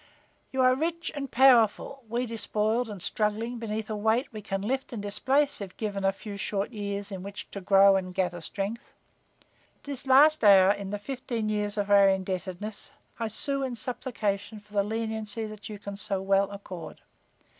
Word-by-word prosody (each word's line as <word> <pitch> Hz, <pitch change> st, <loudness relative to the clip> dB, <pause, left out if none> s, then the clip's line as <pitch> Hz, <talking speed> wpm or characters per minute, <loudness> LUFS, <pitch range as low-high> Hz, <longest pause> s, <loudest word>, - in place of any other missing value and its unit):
You 265 Hz, -, 0 dB
are 255 Hz, 0 st, +6 dB
rich 330 Hz, +5 st, -2 dB
and 280 Hz, -2 st, -4 dB
powerful, 255 Hz, +1 st, +4 dB
we 240 Hz, +2 st, -1 dB
despoiled 225 Hz, 0 st, -1 dB
and 205 Hz, -2 st, -7 dB
struggling 220 Hz, +4 st, -1 dB
beneath 220 Hz, -1 st, -3 dB
a 215 Hz, -, -3 dB
weight 220 Hz, +5 st, +1 dB
we 215 Hz, -, -6 dB
can 195 Hz, -1 st, -3 dB
lift 265 Hz, +5 st, -2 dB
and 235 Hz, -, -5 dB
displace 260 Hz, +7 st, +1 dB
if 190 Hz, -2 st, -8 dB
given 205 Hz, -3 st, -3 dB
a 195 Hz, -, +4 dB
few 200 Hz, +1 st, -8 dB
short 200 Hz, +2 st, -2 dB
years 205 Hz, -2 st, -4 dB
in 190 Hz, -2 st, -5 dB
which 200 Hz, +1 st, -8 dB
to 200 Hz, -, -6 dB
grow 195 Hz, +1 st, +6 dB
and 185 Hz, -1 st, -1 dB
gather 180 Hz, -2 st, -1 dB
strength. 200 Hz, +7 st, -5 dB, 0.8 s
At -, -, -39 dB
this 275 Hz, -2 st, -5 dB
last 295 Hz, +3 st, +6 dB
hour 195 Hz, -2 st, +8 dB
in 200 Hz, -1 st, -3 dB
the 205 Hz, -, -2 dB
fifteen 235 Hz, -1 st, -4 dB
years 210 Hz, 0 st, -1 dB
of 205 Hz, 0 st, -1 dB
our 200 Hz, -1 st, +7 dB
indebtedness, 190 Hz, +2 st, -3 dB, 0.3 s
I 230 Hz, -, -1 dB
sue 275 Hz, +6 st, -3 dB
in 260 Hz, -2 st, -2 dB
supplication 220 Hz, -4 st, -3 dB
for 210 Hz, 0 st, -22 dB
the 200 Hz, -1 st, +2 dB
leniency 220 Hz, 0 st, -3 dB
that 215 Hz, 0 st, -9 dB
you 210 Hz, -, -6 dB
can 200 Hz, 0 st, -7 dB
so 200 Hz, -2 st, -2 dB
well 195 Hz, +1 st, +2 dB
accord. 190 Hz, -4 st, -9 dB
210 Hz, 185 wpm, -28 LUFS, 200-235 Hz, 0.8 s, hour